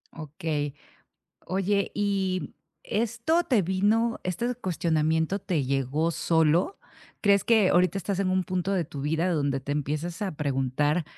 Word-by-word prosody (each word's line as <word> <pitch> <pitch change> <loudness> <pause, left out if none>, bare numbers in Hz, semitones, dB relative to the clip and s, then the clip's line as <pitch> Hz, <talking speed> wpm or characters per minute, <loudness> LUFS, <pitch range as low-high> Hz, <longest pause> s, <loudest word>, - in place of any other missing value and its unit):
Okey. 150 -2 -3 0.7
Oye, 195 +1 0
¿y 195 -3 -1 0.3
esto 235 +10 0
te 230 -8 +2
vino 210 +6 +1
este 235 +7 -2
cuestionamiento 160 -3 0
te 170 -8 -1
llegó 140 +5 0
solo? 165 - +2 0.4
¿Crees 200 -2 +4
que 220 -5 +4
ahorita 180 +2 +3
estás 195 +1 -3
en 185 - +1
un 185 -1 +1
punto 185 +1 -1
de 180 -4 +1
tu 140 -1 -8
vida 160 +5 0
donde 140 -3 0
te 145 +2 -4
empiezas 155 +6 -3
a 190 -6 -3
preguntar 145 +3 0
175 Hz, 140 wpm, -27 LUFS, 150-200 Hz, 0.7 s, Crees